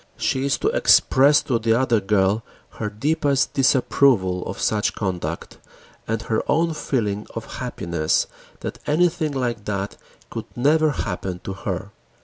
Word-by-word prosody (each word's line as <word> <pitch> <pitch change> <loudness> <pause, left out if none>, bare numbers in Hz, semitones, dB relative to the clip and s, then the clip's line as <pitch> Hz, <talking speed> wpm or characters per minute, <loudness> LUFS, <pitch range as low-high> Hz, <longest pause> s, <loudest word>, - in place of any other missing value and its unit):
She 130 - 0
is 140 - +1
to 420 - +1
express 145 - +5
to 120 -4 0
the 115 0 +2
other 120 -4 +2
girl 100 +1 +2 0.4
her 105 - -1
deepest 140 +4 0
disapproval 125 -8 +3
of 95 - -5
such 105 -1 0
conduct 90 -5 -4 0.5
and 115 0 -2
her 110 -1 0
own 165 +2 +2
feeling 105 -9 -2
of - - -6
happiness 85 -2 0 0.4
that - - -5
anything 155 0 +2
like 120 -6 -2
that 100 -1 -3 0.3
could - - -5
never 155 +5 +3
happen 95 -8 -3
to 95 - -4
her. 95 - -5
115 Hz, 140 wpm, -22 LUFS, 100-140 Hz, 0.5 s, express